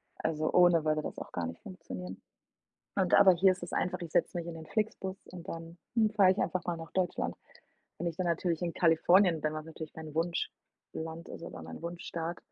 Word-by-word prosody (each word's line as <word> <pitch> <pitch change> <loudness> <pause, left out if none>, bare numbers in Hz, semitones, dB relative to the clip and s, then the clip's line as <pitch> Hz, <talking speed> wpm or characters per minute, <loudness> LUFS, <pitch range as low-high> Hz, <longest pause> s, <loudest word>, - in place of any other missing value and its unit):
Also, 155 0 -1
ohne 175 -2 +6
würde 155 0 +2
das - - -6
auch - - -7
gar 85 -2 -2
nicht 85 - -8
funktionieren. 95 - -8 0.8
Und 190 -2 +3
aber 195 -2 +8
hier 185 +2 +5
ist 180 - -8
es 175 - -6
einfach, 180 - 0
ich 170 -2 -6
setze 175 - +2
mich 170 -1 -3
in 170 - -5
den 160 -1 -9
FlixBus 210 -3 -2 0.2
und 180 0 -9
dann, 165 +1 -7 0.2
hm, 220 -2 +4
fahre 200 -3 +6
ich 190 - -7
einfach 185 -2 0
mal 175 -1 0
nach 165 0 -9
Deutschland. 185 -2 0 0.6
Wenn 175 - -3
ich 170 -2 -2
dann 185 - -1
natürlich 170 0 0
in 170 -1 -1
Kalifornien 175 +1 +5
bin, 155 +1 0
was 155 0 -5
natürlich 160 -1 -8
mein 155 -2 -8
Wunschland 165 0 -4
ist - - -8
oder 125 - -7
mein 80 0 -8
Wunschstaat, 170 0 -4
170 Hz, 210 wpm, -31 LUFS, 160-180 Hz, 0.8 s, aber